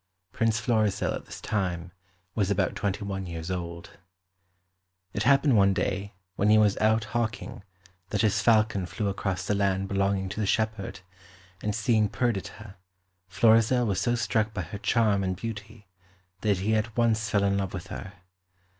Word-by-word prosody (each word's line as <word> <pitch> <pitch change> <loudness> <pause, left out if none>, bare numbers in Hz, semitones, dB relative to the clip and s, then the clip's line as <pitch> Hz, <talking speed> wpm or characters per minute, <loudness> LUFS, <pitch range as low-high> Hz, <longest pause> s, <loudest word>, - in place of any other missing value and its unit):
Prince 115 0 +1
Florizel 110 -3 +1
at - - -6
this - - -9
time 90 -4 -2 0.4
was 100 -3 0
about 100 -2 +1
twenty 100 +1 -2
one 95 -2 -4
years 85 +1 -5
old. 85 -2 -6 1.1
It 100 - -2
happened 135 +2 +4
one 100 -2 +4
day 100 +2 -2 0.2
when 100 - +2
he 110 - +6
was 105 -2 +4
out 110 +1 +3
hawking 110 -1 -3 0.5
that 105 0 0
his 110 0 +2
falcon 110 -5 +3
flew 100 +4 -2
across 95 -2 -2
the 105 - 0
land 100 -1 0
belonging 100 0 0
to 100 - -5
the 105 - 0
shepherd, 110 -3 -1 0.6
and 105 -1 -1
seeing 110 -2 +2
Perdita, 105 -3 -3 0.5
Florizel 115 +5 +4
was 100 -4 0
so 120 0 +1
struck 110 -2 0
by 95 - -2
her 95 +5 -7
charm 105 -3 +2
and 95 -1 -1
beauty 105 0 -7 0.5
that 105 -1 +1
he 100 +4 0
at 110 +1 -1
once 110 -2 +2
fell 100 -1 +2
in 100 0 +2
love 95 -1 -2
with 90 -1 -6
her. 95 0 -7
105 Hz, 165 wpm, -27 LUFS, 95-110 Hz, 1.1 s, he